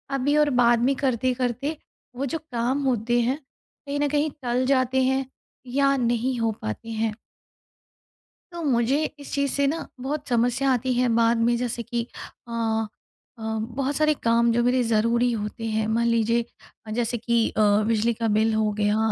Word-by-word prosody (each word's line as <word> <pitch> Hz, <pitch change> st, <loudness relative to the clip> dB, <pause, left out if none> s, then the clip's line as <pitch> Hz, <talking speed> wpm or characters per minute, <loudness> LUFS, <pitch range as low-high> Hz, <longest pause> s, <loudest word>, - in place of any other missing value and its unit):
अभी 275 Hz, +2 st, +1 dB
और 300 Hz, -1 st, +4 dB
बाद 235 Hz, 0 st, +5 dB
में 270 Hz, +2 st, +3 dB
करते-करते 255 Hz, +2 st, -1 dB, 0.4 s
वो 265 Hz, +3 st, -2 dB
जो 280 Hz, +4 st, -2 dB
काम 260 Hz, -1 st, -2 dB
होते 240 Hz, -1 st, +1 dB
हैं 250 Hz, +4 st, 0 dB, 0.5 s
कहीं 285 Hz, +1 st, -2 dB
न 290 Hz, -, +2 dB
कहीं 295 Hz, +2 st, +1 dB
टल 245 Hz, +1 st, 0 dB
जाते 260 Hz, 0 st, +1 dB
हैं 265 Hz, +1 st, +1 dB, 0.5 s
या 275 Hz, 0 st, +4 dB
नहीं 240 Hz, +1 st, 0 dB
हो 230 Hz, -1 st, +1 dB
पाते 110 Hz, -, -5 dB
हैं। 220 Hz, -1 st, -1 dB, 1.4 s
तो 345 Hz, -1 st, -6 dB
मुझे 265 Hz, +1 st, +2 dB, 0.2 s
इस 285 Hz, -, -10 dB
चीज़ 280 Hz, -1 st, 0 dB
से 280 Hz, -, +1 dB
ना 325 Hz, +4 st, -2 dB
बहुत 290 Hz, +3 st, -3 dB
समस्या 245 Hz, +2 st, +2 dB
आती 255 Hz, 0 st, +1 dB
है 250 Hz, +1 st, +2 dB
बाद 230 Hz, 0 st, +3 dB
में 235 Hz, +1 st, +2 dB
जैसे 240 Hz, -1 st, -3 dB
कि 235 Hz, 0 st, -3 dB, 0.4 s
अ 225 Hz, -1 st, -1 dB, 0.5 s
अ, -, -, -10 dB, 0.2 s
बहुत 260 Hz, +5 st, -2 dB
सारे 305 Hz, +1 st, +3 dB
काम 235 Hz, 0 st, +3 dB
जो 240 Hz, +1 st, +2 dB
मेरे 250 Hz, +1 st, +2 dB
ज़रूरी 230 Hz, +2 st, +2 dB
होते 220 Hz, 0 st, -4 dB
हैं। 220 Hz, 0 st, 0 dB
मान 230 Hz, +2 st, +1 dB
लीजिए 230 Hz, 0 st, +2 dB, 0.5 s
जैसे 240 Hz, +1 st, -1 dB
कि 235 Hz, 0 st, +1 dB
अ, -, -, -1 dB, 0.3 s
बिजली 230 Hz, +1 st, +2 dB
का 230 Hz, 0 st, -2 dB
बिल 220 Hz, +1 st, +2 dB
हो 215 Hz, -1 st, +1 dB
गया 210 Hz, 0 st, +2 dB
240 Hz, 175 wpm, -24 LUFS, 230-265 Hz, 1.4 s, बाद